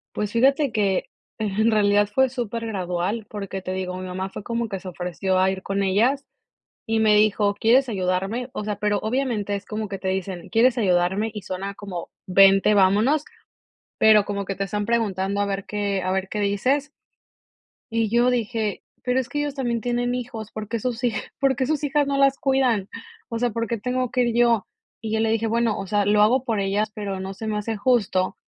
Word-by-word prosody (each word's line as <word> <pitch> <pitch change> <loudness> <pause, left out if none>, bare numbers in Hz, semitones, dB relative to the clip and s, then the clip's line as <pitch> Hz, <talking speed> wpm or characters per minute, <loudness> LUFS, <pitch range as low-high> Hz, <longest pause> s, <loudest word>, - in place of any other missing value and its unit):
Pues 210 0 -2
fíjate 270 +3 +3
que, 200 -3 +1 0.3
en 220 +1 +1
realidad 205 -1 +3
fue 265 +3 +3
supergradual, 215 -4 -3
porque 195 -2 -6
te 185 - -4
digo, 185 -1 -3
mi 185 0 -6
mamá 185 +1 -4
fue 195 - -7
como 230 +1 -2
que 195 -2 -5
se 185 - -8
ofreció 180 +1 -2
a 190 +1 +3
ir 190 0 -5
con 200 0 -1
ellas 240 +9 +2 0.6
y 225 0 +1
me 215 -1 +4
dijo: 210 -1 +3
"¿Quieres 245 +6 +3
ayudarme?" 195 +4 -1
O 210 - -4
sea, 210 -1 -2
pero 205 0 +1
obviamente 220 -3 -1
es 200 0 -4
como 215 0 -4
que 195 0 -5
te 190 0 -4
dicen: 190 -1 -3
"¿Quieres 240 +2 +3
ayudarme?" 190 +2 +1
Y 210 -2 -7
suena 195 +2 -5
como 185 -5 -7 0.2
vente, 195 +2 +5
vámonos, 210 +10 +3 0.7
pero 215 -2 +6
como 200 -1 -3
que 195 - -3
te 195 - -1
están 205 +1 -2
preguntando 200 -4 0
a 205 - +1
ver 195 -1 -3
que 200 -2 -2
a 185 - -1
ver 190 0 -1
qué 210 - -3
dices. 255 +9 0 1.0
Y 225 -2 0
yo 240 +2 +3
dije: 225 -4 -1 0.2
"Pero 250 +1 +1
es 255 - -1
que 295 - -3
ellos 290 -1 -2
también 240 -4 -1
tienen 245 +1 -1
hijos, 230 -4 -5
¿por 215 -1 -6
qué 230 - -2
sus 240 +2 -3
hij, 240 -3 +1 0.3
por 270 -2 +2
qué 260 - 0
sus 305 +1 -1
hijas 290 0 +1
no 280 0 0
las 275 -1 +4
cuidan? 255 -7 +1 0.4
O 230 - -2
sea, 245 +1 +1
¿por 230 +1 -2
qué 230 +1 -2
tengo 250 +2 -1
que 250 0 +2
ir 235 -1 -1
yo?" 235 -4 +3 0.3
Y 220 - -5
yo 220 - +1
le 225 0 +2
dije: 225 0 +1
"Bueno, 230 -1 +1
o 195 - -5
sea, 205 +2 +1
lo 210 +1 +3
hago 245 +5 +3
por 225 -5 -1
ellas, 205 +2 0
pero 200 -2 -4
no 190 +1 -5
se 220 +3 -7
me 215 - -1
hace 215 +2 -2
justo". 200 -5 +1
210 Hz, 215 wpm, -23 LUFS, 195-235 Hz, 1.0 s, pero